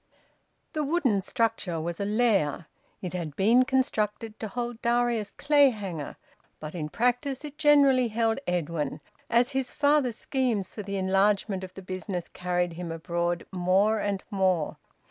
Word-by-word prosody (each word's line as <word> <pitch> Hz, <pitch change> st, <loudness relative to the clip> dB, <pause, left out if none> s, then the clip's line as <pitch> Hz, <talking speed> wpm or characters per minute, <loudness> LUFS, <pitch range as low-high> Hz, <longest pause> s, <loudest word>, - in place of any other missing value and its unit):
The 305 Hz, -, -1 dB
wooden 275 Hz, -, +1 dB
structure 215 Hz, -5 st, -1 dB
was 170 Hz, +1 st, -4 dB
a 200 Hz, -, -1 dB
lair. 205 Hz, -8 st, +1 dB, 0.4 s
It 180 Hz, -, -4 dB
had 165 Hz, -5 st, -4 dB
been 235 Hz, +8 st, +4 dB
constructed 225 Hz, -4 st, -1 dB
to 220 Hz, -, -4 dB
hold 240 Hz, +2 st, -4 dB
Darius 235 Hz, -3 st, +1 dB
Clayhanger; 220 Hz, -, +2 dB, 0.4 s
but 155 Hz, 0 st, -7 dB
in 155 Hz, -4 st, -4 dB
practice 250 Hz, -, 0 dB
it 295 Hz, -1 st, -8 dB
generally 280 Hz, -4 st, +5 dB
held 225 Hz, +2 st, 0 dB
Edwin, 165 Hz, -4 st, -2 dB, 0.3 s
as 240 Hz, +3 st, +3 dB
his 265 Hz, -2 st, -1 dB
father's 285 Hz, -5 st, +2 dB
schemes 240 Hz, -8 st, -1 dB
for 210 Hz, -, -5 dB
the 200 Hz, 0 st, -4 dB
enlargement 195 Hz, +1 st, +1 dB
of 185 Hz, 0 st, -9 dB
the 195 Hz, -, -9 dB
business 185 Hz, -1 st, -4 dB
carried 180 Hz, -1 st, -1 dB
him 170 Hz, 0 st, -6 dB
abroad 170 Hz, +1 st, -2 dB
more 190 Hz, +4 st, +2 dB
and 200 Hz, -2 st, -2 dB
more. 185 Hz, -5 st, +1 dB
205 Hz, 145 wpm, -27 LUFS, 180-245 Hz, 0.4 s, generally